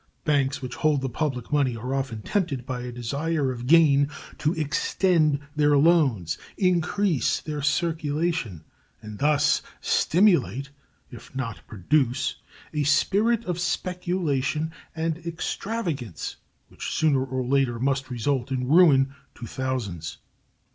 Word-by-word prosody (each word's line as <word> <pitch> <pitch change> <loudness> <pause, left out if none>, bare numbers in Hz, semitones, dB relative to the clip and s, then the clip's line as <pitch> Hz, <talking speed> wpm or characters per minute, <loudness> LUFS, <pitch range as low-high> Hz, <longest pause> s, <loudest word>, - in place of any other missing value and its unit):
Banks 140 -2 +1
which 125 - -5
hold 150 -3 +2
the 135 - -2
public 130 -1 -3
money 135 -5 +2
are 125 +4 -4
often 130 -6 -3
tempted 155 - -1
by 125 -1 -4
a 125 0 -5
desire 140 +4 -1
of 125 -1 -6
gain 145 -3 +5 0.3
to 150 - +1
extend 155 0 +1 0.2
their 145 -1 +4
loans, 140 - +3 0.2
increase 180 - +1
their 150 -1 -5
circulation, 155 - -1 0.4
and 105 -1 -9
thus 150 +1 +3 0.2
stimulate, 140 - +2 0.4
if 120 +2 -12
not 125 -5 -4
produce, 125 - 0 0.4
a 150 - 0
spirit 215 - +2
of 180 -1 -2
speculation 170 -5 -1 0.2
and 160 0 -1
extravagance 170 - -4 0.3
which - - -6
sooner 145 -4 +2
or 130 -1 -3
later 130 -2 +1
must 135 +2 -1
result 125 +2 -1
in 125 -1 -1
ruin 140 -5 +5 0.2
to 120 - -8
thousands. 105 - -4
140 Hz, 125 wpm, -25 LUFS, 125-165 Hz, 0.4 s, gain